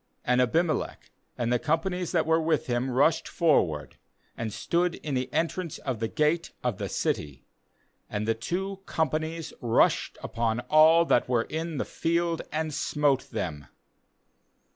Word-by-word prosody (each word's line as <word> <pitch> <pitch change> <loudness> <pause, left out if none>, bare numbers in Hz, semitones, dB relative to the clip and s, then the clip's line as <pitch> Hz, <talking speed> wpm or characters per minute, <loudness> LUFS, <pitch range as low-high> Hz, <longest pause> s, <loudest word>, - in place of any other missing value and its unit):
^And 125 +1 +4
Abim 165 +8 +2
elech, - - -4 0.3
and 120 0 0
the 120 - +2
companies 170 +3 -1
that 170 -3 +2
were 160 +1 +3
with 160 -2 +1
him, 120 +1 -1
rushed 145 +6 +2
forward, 90 - +1 0.4
and 115 -2 -4
stood 170 +9 0
in 150 - -5
the 130 0 -1
entrance 165 +1 -1
of 130 -5 -4
the 115 - -1
gate 155 +5 +1
of 120 -5 -1
the 100 -2 -3
city; 70 -5 -2 0.6
and 105 +1 -3
the 115 - +3
two 190 - -3
companies 160 +1 -2
rushed 115 -1 +2
upon 115 0 -1
all 160 +2 +7
that 125 - +2
were 120 -2 +2
in 160 +2 -4
the - - -1
field, 170 0 0
and 155 0 -2
smote 145 -2 +1
them. 80 - -4
150 Hz, 155 wpm, -27 LUFS, 120-165 Hz, 0.6 s, all